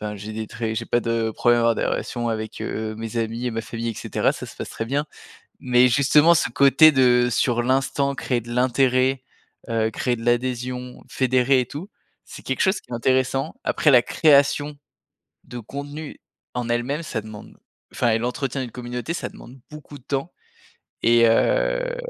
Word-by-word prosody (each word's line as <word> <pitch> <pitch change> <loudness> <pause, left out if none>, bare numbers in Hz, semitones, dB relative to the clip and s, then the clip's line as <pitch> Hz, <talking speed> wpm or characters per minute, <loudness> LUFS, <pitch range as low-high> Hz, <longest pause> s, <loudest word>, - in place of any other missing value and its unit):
enfin 105 0 -5
j'ai 105 +2 -8
des 110 0 -5
traits 115 0 -4
j'ai - - -3
pas 120 - +1
de 115 -1 -1
problème 120 +2 +2
avec - - +1
avoir 115 - +3
des - - -1
relations 120 -2 -3
avec, 110 -1 -5
heu, 110 0 -4
mes 115 +1 -5
amis 115 +2 -3
et - - 0
ma 115 0 -3
famille, 115 +1 -5
et 115 - -3
cetera, - - -1
ça - - -8
se - - -13
passe - - -6
très 115 - -5
bien, 140 +4 -1 0.6
mais 125 0 +4
justement, 145 +5 +5
ce 160 - +1
côté 140 +5 +6
de 125 -2 +4
sur 120 0 +1
l'instant, 135 +2 0
créer 125 -2 -1
de 120 +1 -9
l'intérêt, 130 +1 +2 0.5
heu, 110 -1 +1
créer 120 +2 -1
de 115 - -9
l'adhésion, 125 +1 -2
fédérer 130 0 +2
et 125 - -2
tout, 155 - -8 0.4
c'est - - -11
quelque - - -3
chose 190 0 +1
qui - - -28
est - - -4
intéressant. 130 +4 0
Après 150 - +2
la 125 -3 +6
création 145 0 +3 0.7
de 125 - -8
contenu 145 +6 -8 0.3
en 125 -1 -3
elle-même, 120 +6 -1
ça 110 - -4
demande 105 -1 -12 0.4
enfin 120 - +1
et 110 - +2
l'entretien 125 +3 -3
d'une 125 -3 -6
communauté, 125 +5 -5
ça - - -4
demande 130 +2 -14
beaucoup 150 -1 -11
de 130 - -22
temps 140 +5 -3 0.7
et 115 0 +5
heu - - +1
125 Hz, 190 wpm, -22 LUFS, 115-135 Hz, 0.7 s, côté